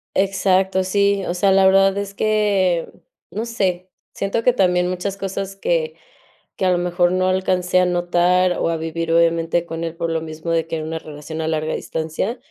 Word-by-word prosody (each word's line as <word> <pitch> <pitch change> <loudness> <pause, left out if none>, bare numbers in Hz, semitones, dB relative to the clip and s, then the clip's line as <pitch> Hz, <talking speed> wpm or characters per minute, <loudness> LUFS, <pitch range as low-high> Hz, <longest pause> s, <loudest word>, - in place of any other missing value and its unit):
Exacto, 190 -1 +2
sí, 200 +1 +1
o - - -1
sea, 195 +2 +2
la 190 0 +5
verdad 195 +1 +4
es 200 0 -4
que 200 -5 +1 0.4
no 220 +2 -3
sé, 190 -6 -2 0.2
siento 200 +3 -2
que 250 - +4
también 180 -5 +2
muchas 185 +2 -3
cosas 195 0 -4
que 475 - -1 0.6
que, 190 - -1
a 185 - +3
lo - - +1
mejor, 175 0 +1
no 185 0 +1
alcancé 185 -1 +1
a 180 - +3
notar 175 +1 +2
o - - 0
a 165 - 0
vivir, 165 +1 -3
obviamente, 170 0 +2
con 165 0 -5
él 165 0 -5
por 165 0 -3
lo 165 - 0
mismo 160 +1 -6
de 165 -1 0
que 165 - -3
era 160 - -4
una 160 +1 -4
relación 155 +1 -8
a 160 - -2
larga 155 -1 -1
distancia, 160 +9 -3
180 Hz, 195 wpm, -20 LUFS, 165-195 Hz, 0.6 s, la